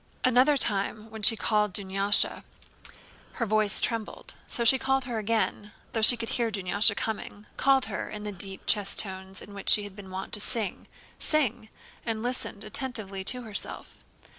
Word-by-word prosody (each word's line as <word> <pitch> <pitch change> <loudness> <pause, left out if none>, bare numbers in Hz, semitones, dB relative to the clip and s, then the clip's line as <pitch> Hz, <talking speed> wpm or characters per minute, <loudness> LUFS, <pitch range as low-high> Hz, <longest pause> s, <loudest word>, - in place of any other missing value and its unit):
Another 255 +4 +4
time 215 -1 0
when 220 -1 -9
she 225 +2 +7
called 210 -2 0
Dunyásha 195 +1 +2 0.9
her 230 - -2
voice 215 -1 +3
trembled, 230 -3 -3
so 235 - +1
she 260 +3 +6
called 265 -1 0
again—though 220 -1 -3
she 240 +3 +8
could 230 -1 -5
hear 235 -2 -1
Dunyásha 205 +1 +2
coming—called 225 +5 -1
her - - -5
in 210 -1 -7
the 210 - -5
deep 195 0 -2
chest 205 -2 +1
tones 190 -1 -2
in 200 - -13
which 200 -1 -4
she 210 - +5
had 205 -2 -9
been 200 -2 -11
wont 190 +1 -7
to - - -1
sing, 210 -2 -3 1.2
and 225 -1 -4
listened 245 -4 -4
attentively 215 -4 -1
to 250 +3 0
herself. 215 -3 -7
215 Hz, 155 wpm, -27 LUFS, 200-230 Hz, 1.2 s, she